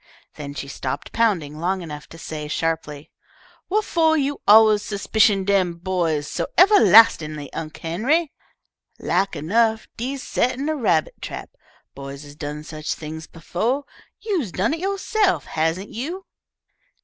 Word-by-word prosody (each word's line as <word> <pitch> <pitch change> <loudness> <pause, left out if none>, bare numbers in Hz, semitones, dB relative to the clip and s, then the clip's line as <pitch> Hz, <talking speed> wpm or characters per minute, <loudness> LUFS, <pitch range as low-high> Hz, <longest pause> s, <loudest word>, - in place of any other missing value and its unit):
Then 145 -1 -8
she 140 - -5
stopped 140 0 -5
pounding 170 -10 0
long 185 +2 -1
enough 150 -2 -8
to 165 - -13
say, 155 -2 -6
sharply, 150 -2 -3 0.6
"Whuffo' 340 -6 +2
you 285 -1 -1
alluz 215 0 +7
'spicion 210 0 +2
dem 190 -3 +2
boys 170 -4 -1
so - - -3
evahlastin'ly, 225 - +6
Unc' 155 -1 -6
Henry? 265 - 0 0.7
Lak 190 +1 0
enough 220 +8 +1
dee's 260 +3 -4
settin' 260 +4 -1
a 310 - 0
rabbit 175 - 0
trap. - - -7 0.4
Boys 140 +1 -8
has 145 0 -12
done 150 0 -6
such 155 -1 -5
things 160 +1 -8
befo'. 225 - -2 0.3
You's 355 - -2
done 200 - 0
it 325 - -3
yo'se'f, 395 +1 0
hasn't 165 +5 -1
you?" 335 - -5
190 Hz, 135 wpm, -22 LUFS, 155-260 Hz, 0.7 s, alluz